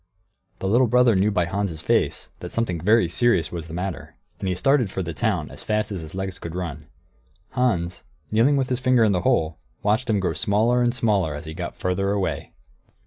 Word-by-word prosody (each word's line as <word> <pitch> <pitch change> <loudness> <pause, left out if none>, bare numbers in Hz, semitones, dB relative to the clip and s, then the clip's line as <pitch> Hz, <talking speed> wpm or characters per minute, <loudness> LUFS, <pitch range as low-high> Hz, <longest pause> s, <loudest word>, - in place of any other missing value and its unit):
The 95 - -3
little 120 +5 +4
brother 125 -1 +4
knew 95 +3 +3
by 90 -4 +1
Hans' 95 -2 -2
face - - 0
that - - -7
something 90 -8 -1
very 105 +1 +4
serious 90 -3 +2
was 85 -2 -6
the 80 - -7
matter, 90 0 -5 0.2
and 95 - -3
he 90 - 0
started 135 +1 +2
for 95 0 -3
the 85 -1 -5
town, - - -1
as - - -6
fast 105 0 -1
as 95 -4 -4
his 80 +2 -9
legs 95 -1 -4
could 85 0 -7
run. 75 -5 -5 0.6
Hans, 90 -9 0 0.3
kneeling 120 +7 +4
with 130 -2 0
his 125 -1 0
finger 125 -2 +3
in 110 - +4
the 90 -2 +1
hole, 80 -2 +1 0.2
watched 110 +4 +1
him 105 -2 +2
grow 90 -3 0
smaller 105 +8 +2
and 120 0 +1
smaller 100 - +1
as 75 +2 -7
he 80 - -6
got 85 +1 -5
farther 90 +2 -1
away. 100 -2 -2
95 Hz, 210 wpm, -23 LUFS, 85-115 Hz, 0.6 s, little